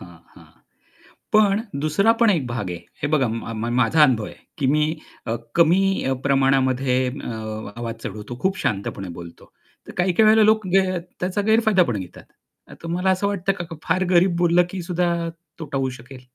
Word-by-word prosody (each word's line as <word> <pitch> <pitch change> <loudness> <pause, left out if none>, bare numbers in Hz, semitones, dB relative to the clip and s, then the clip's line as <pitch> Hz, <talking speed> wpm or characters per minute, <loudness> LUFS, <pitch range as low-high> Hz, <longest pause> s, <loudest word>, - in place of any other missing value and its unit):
हां, - - -13 0.2
हां. - - -16 0.9
पण 210 -1 +4 0.2
दुसरा 175 +9 +3
पण 230 - +6
एक 165 -10 +1
भाग 120 -6 -4
आहे, 90 - -5 0.2
हे 145 - 0
बघा 135 -5 +3
म - - -3 0.3
म - - -2
माझा 130 +6 +3
अनुभव 120 -7 +2
आहे, - - -10 0.2
की 140 - 0
मी 150 0 +3 0.4
अ, 115 - 0 0.2
कमी 170 +3 +4 0.3
अ, - - +2
प्रमाणामध्ये 135 -1 +2
अ, 125 0 -5 0.5
आवाज 115 -1 -4
चढवतो, 105 +4 -7
खूप 190 0 0
शांतपणे 100 -5 -3
बोलतो. 85 -1 -12 0.4
तर - - -8
काही-काही 185 +4 +3
वेळेला 220 0 +6
लोक 215 -2 +3
ग - - +8 0.4
त्याचा 185 +3 -1
गैरफायदा 220 -4 +4
पण 120 -9 -2
घेतात. 90 -2 -10 0.5
तर - - -11
तुम्हाला 175 +3 -1
असं 190 +2 0
वाटतं 195 -1 0
का, 190 - -6
का 165 0 -9
फार 185 +4 +1
गरीब 180 0 +4
बोललं 175 0 +4
की 190 - -4
सुद्धा 175 0 +1 0.5
तोटा 150 -4 -4
होऊ 135 -1 0
शकेल? 125 +2 -12
165 Hz, 185 wpm, -22 LUFS, 125-190 Hz, 0.9 s, ग